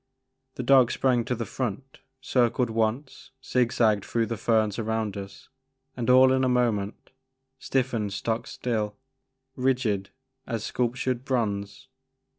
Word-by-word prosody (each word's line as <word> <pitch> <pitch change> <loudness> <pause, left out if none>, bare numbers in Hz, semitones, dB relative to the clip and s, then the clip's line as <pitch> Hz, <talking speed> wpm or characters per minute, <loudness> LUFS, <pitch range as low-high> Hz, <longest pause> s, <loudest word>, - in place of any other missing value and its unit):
The 125 - -4
dog 130 -1 +6
sprang 125 -3 +1
to 125 - -1
the 115 0 -4
front, 130 +2 -5 0.2
circled 125 -2 +1
once, 115 +5 -2 0.2
zig 125 -2 +1
zagged 105 -4 +2
through 115 -1 0
the 115 - -3
ferns 110 -1 +1
around 110 -2 -2
us 100 -1 -9 0.5
and, 120 -1 -2
all 130 +1 +7
in 130 0 +2
a 130 - +2
moment, 115 -5 -1 0.5
stiffened 125 -7 -1
stock 110 +3 -2
still, 110 -4 -2 0.6
rigid 125 -7 0 0.4
as 115 -3 -3
sculptured 125 0 -1
bronze. 105 -3 -2
120 Hz, 130 wpm, -26 LUFS, 110-130 Hz, 0.6 s, all